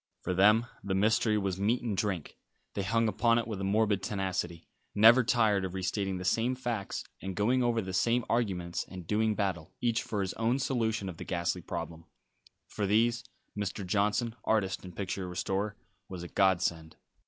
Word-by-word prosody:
For 90 - -1
them 105 +5 +5 0.2
the 95 -1 -1
mystery 110 +2 +3
was 95 -2 -1
meat 110 +5 +1
and 110 -4 -1
drink. 95 -6 -2 0.4
They 100 - -2
hung 115 +4 +1
upon 115 +2 +3
it 120 - -1
with 105 -4 -4
a - - -2
morbid 100 0 +2
tenacity, 95 -4 -3 0.3
never 115 +5 +7
tired 110 -5 +2
of 95 0 -4
re 95 - -3
stating 95 0 -1
the 90 - -6
same 115 +7 +1
facts, 120 -5 -3 0.2
and 95 -1 -5
going 120 +6 +2
over 120 -2 +1
the 95 0 -5
same 115 +6 +2
arguments, 95 -7 -1
and 90 -2 -8
doing 110 +3 +1
battle, 95 -6 -2
each 115 -1 +1
for 105 -2 -3
his 95 -1 -2
own 115 +3 +1
solution 115 -6 -1
of 90 -3 -6
the - - -6
ghastly 85 +1 -1
problem. 85 -1 -6 0.6
For 105 -2 -2
these 115 +4 +2 0.3
Mr. 100 -1 -3
Johnson, 105 +4 +1
artist 95 -4 0
and 90 -2 -10
picture 95 -1 -3
restorer, 95 +3 -2 0.3
was 90 -2 -6
a - - -6
godsend. 85 -4 +1
100 Hz, 185 wpm, -30 LUFS, 95-115 Hz, 0.6 s, never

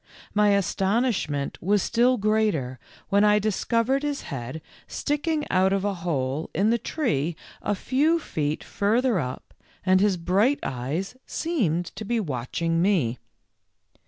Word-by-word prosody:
My 210 -1 +4
astonishment 195 - 0
was 200 +2 +2
still 245 +2 +3
greater 205 - 0 0.3
when 200 +1 +4
I 210 0 +5
dis 210 -1 -1
covered 235 +4 +1
his 290 -1 -2
head 130 +3 -5 0.3
sticking 300 +1 -1
out 190 +1 +3
of 195 0 0
a 205 - +1
hole 155 -4 -2
in 200 +6 +3
the 235 - +2
tree 175 - -1 0.3
a 205 - 0
few 290 - +2
feet 155 - -3
further 225 +1 +1
up 125 -4 -5 0.3
and 185 0 +4
his 200 -3 +3
bright 200 +11 +2
eyes 140 - -3
seemed 200 - 0
to - - -6
be 230 +3 0
watching 165 - -1
me. 165 - +1
200 Hz, 140 wpm, -25 LUFS, 160-235 Hz, 0.3 s, I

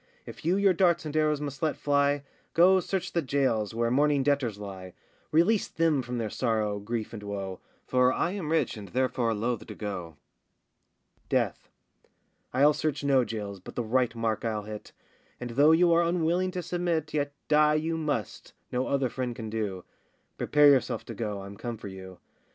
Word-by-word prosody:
If - - -10
you 175 +4 +2
your 200 -2 +4
darts 175 -2 +2
and 155 0 -5
arrows 155 -1 +2
must 145 -2 -5
let 155 -2 0
fly, 145 0 +1 0.3
Go 185 +3 +6
search 190 0 -3
the 170 - +1
jails, 130 -7 0
where 115 0 +1
mourning 145 +1 +3
debtors 135 -7 +1
lie; 95 -3 -8 0.4
Release 185 +7 +3
them 160 -4 +1
from 125 0 -5
their 115 -2 -1
sorrow, 110 -4 0
grief, 110 +2 -4
and 110 - -6
woe, 100 -2 -5 0.3
For 125 0 +3
I 170 - 0
am 185 -6 -4
rich 160 -6 +1
and 100 -2 -8
therefore 125 -2 0
loth 115 +2 -2
to - - -8
go. 90 -6 -5 1.1
DEATH. - - -1 0.8
I'll 145 +3 +5
search 150 -1 -2
no 135 -2 +4
jails, 105 -4 -5
but 90 - -11
the 120 - -1
right 125 +1 +1
mark 115 -2 -1
I'll 110 -2 -2
hit; 105 0 -8 0.5
And 125 -1 -5
though 145 +6 +5
you 170 +1 +5
are 170 - +5
unwilling 170 +1 +1
to 180 -2 -3
submit, 170 -4 -1
Yet 145 -1 0 0.2
die 150 0 +4
you 160 +2 0
must, 150 -8 -3 0.2
no 125 +1 -1
other 135 -2 +1
friend 125 0 -4
can 110 -2 -6
do,— 100 -5 -3 0.5
Prepare 150 0 +5
yourself 135 -2 +1
to - - -7
go, 105 -4 -4
I'm 100 +1 -9
come 120 +1 -5
for 105 - -8
you. 95 -1 -10
130 Hz, 185 wpm, -28 LUFS, 110-155 Hz, 1.1 s, Go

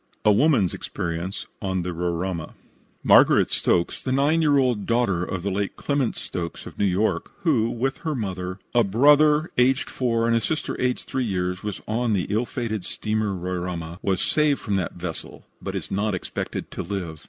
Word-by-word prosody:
A 105 - +7
WOMAN'S 110 - +3
EXPERIENCE 85 +4 -4 0.2
ON 95 -3 -1
THE 90 0 -3
"RORAIMA" 85 0 -3 0.5
Margaret - - +6
Stokes, 85 -1 +1
the 130 - -3
9 145 +5 +3
year 145 -3 +4
old 125 -6 +1
daughter 115 -7 +2
of 90 -1 -4
the 100 - -1
late 100 +1 -2
Clement 140 -4 0
Stokes, 85 -2 -5
of - - -11
New 100 - +3
York, 100 +3 +1
who, 125 -10 +3
with 135 +3 -1
her 155 -3 -2
mother, 95 -5 -4 0.2
a 120 - +5
brother 150 - +4
aged 130 +2 +3
4 115 -3 0
and 115 0 +3
a 115 - +2
sister 155 +7 -2
aged 125 0 -1
3 130 -1 -1
years, 90 -3 -2
was 105 -2 -5
on 115 +1 0
the 95 -4 +1
ill 110 +4 +1
fated 110 -6 -3
steamer 110 0 -2
Roraima, 90 -2 -4
was 95 -2 0
saved 150 -2 +2
from 105 -3 -2
that 90 -4 -2
vessel, 85 -2 -7 0.2
but - - -4
is - - -5
not 100 0 0
expected 90 - -5
to - - -4
live. 90 -6 -4
105 Hz, 185 wpm, -24 LUFS, 90-125 Hz, 0.5 s, A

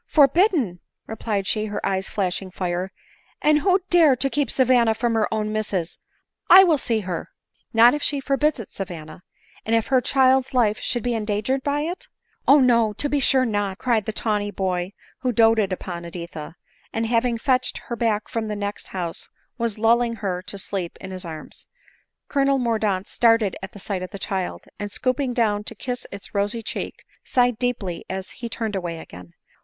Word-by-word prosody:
"Forbidden!" 285 - +3 0.3
replied 215 -2 -3
she, 215 +3 0
her 210 -1 -3
eyes 190 0 -1
flashing 190 -1 -2
fire; 180 0 -3 0.3
" - - -36
and 300 0 +5
who 375 +4 +3
dare 325 -6 +6
to 265 +2 -1
keep 290 -2 0
Savanna 245 -3 +3
from 235 +1 0
her 220 -2 +1
own 215 -1 -1
misses? 195 -6 -2 0.2
— - - -61
I 380 +1 +11
will 325 -6 +3
see 230 -4 0
her." 180 -4 -4 0.4
"Not 235 +1 +7
if 295 - -2
she 285 -1 +1
forbids 275 +1 +1
it, 225 - -8
Savanna; 175 -5 -7 0.4
and 225 - +1
if 225 - +2
her 260 -1 +4
child's 265 0 +3
life 220 -4 +3
should 240 -3 -1
be 245 - 0
endangered 215 +4 -1
by 285 +2 0
it 340 +4 -4
?" - - -45
" - - -42
O, 285 - +8
no, 235 -4 +4
to 290 - -2
be 290 - +1
sure 260 -1 +3
not," 205 -4 -1
cried 230 -5 +1
the - - -2
tawny 210 -1 -1
boy, 185 -1 -2 0.3
who 255 - 0
doted 225 -3 +4
upon 175 -2 -5
Editha, 170 -2 -7 0.4
and, 225 +1 -1
having 235 +1 +1
fetched 255 +1 +1
her 235 - -6
back 220 -2 0
from 225 -1 -3
the 210 - -3
next 205 0 -4
house, 175 -3 -5 0.3
was 230 -3 -1
lulling 230 +1 +3
her 190 -5 -3
to 195 +2 -6
sleep 190 -3 -4
in 190 - -8
his 185 -1 -6
arms. 160 -2 -9 0.6
Colonel 275 -1 +2
Mordaunt 215 -6 0
started 230 -4 +3
at 190 +1 -8
sight 195 -1 -3
of 185 - -5
the 200 - -7
child, 190 -1 -3 0.2
and, 205 0 -4
stooping 255 +1 -1
down 210 -3 +1
to 225 - -5
kiss 245 +3 -5
its 200 0 -9
rosy 205 +3 -1
cheek, - - -5 0.2
sighed 245 -2 +2
deeply 220 -9 -2
as 190 0 -4
he 235 -2 -7
turned 225 -2 -3
away 175 -3 -3
again. 90 - -12
220 Hz, 190 wpm, -23 LUFS, 195-250 Hz, 0.6 s, I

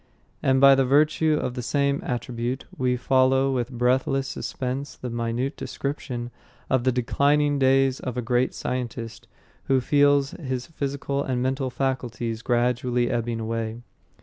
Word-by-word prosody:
And 130 0 +3
by 140 0 +8
virtue 150 +4 +3
of 125 - -2
the 125 - -4
same 140 +2 0
attribute 120 +1 -3
we 125 -1 0
follow 130 +1 +3
with 125 -1 -1
breathless 130 +2 +1
suspense 130 +2 -4
the 125 - -6
minute 120 +4 -2
description 125 -4 -5 0.4
of 130 -2 +2
the 130 - +4
declining 145 +4 +2
days 135 0 +3
of 125 -2 -5
a - - 0
great 125 +2 +1
scientist, 120 -3 -5 0.4
who 135 -1 +3
feels 145 +1 +3
his 130 -5 -4
physical 140 -2 -3
and 125 -2 -1
mental 130 0 -1
faculties 120 -4 -2
gradually 120 0 +1
ebbing 120 -1 -1
away. 115 +1 -3
130 Hz, 140 wpm, -25 LUFS, 120-135 Hz, 0.4 s, by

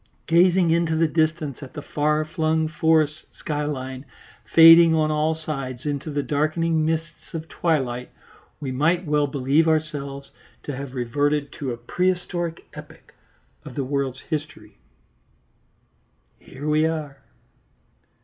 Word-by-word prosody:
Gazing 175 +1 +4
into 165 -1 +1
the 165 +1 +3
distance 155 -3 -1
at 135 - -10
the 150 - -6
far 150 +1 0
flung 160 0 0
forest 155 -1 +1
skyline 140 -3 -4 0.5
fading 165 0 +8
on 155 -1 +2
all 155 +1 +1
sides 135 -5 -6
into 145 +1 -3
the 145 -1 -2
darkening 155 +2 0
mists 165 +1 -4
of 160 0 -5
twilight, 130 -8 -1 0.5
we 135 -3 -4
might 165 +7 +1
well 150 -1 +1
believe 140 +3 +1
ourselves 145 -3 -2 0.3
to 145 - -5
have 135 0 -7
reverted 145 +4 0
to 135 -3 -5
a 120 - -5
prehistoric 175 +1 -2
epoch - - -13 0.5
of - - -10
the 140 - -1
world's 135 -1 -2
history. 155 0 -6 1.6
"Here 145 +3 -9
we 155 +1 +3
are." 150 -4 -4
155 Hz, 130 wpm, -23 LUFS, 140-160 Hz, 1.6 s, fading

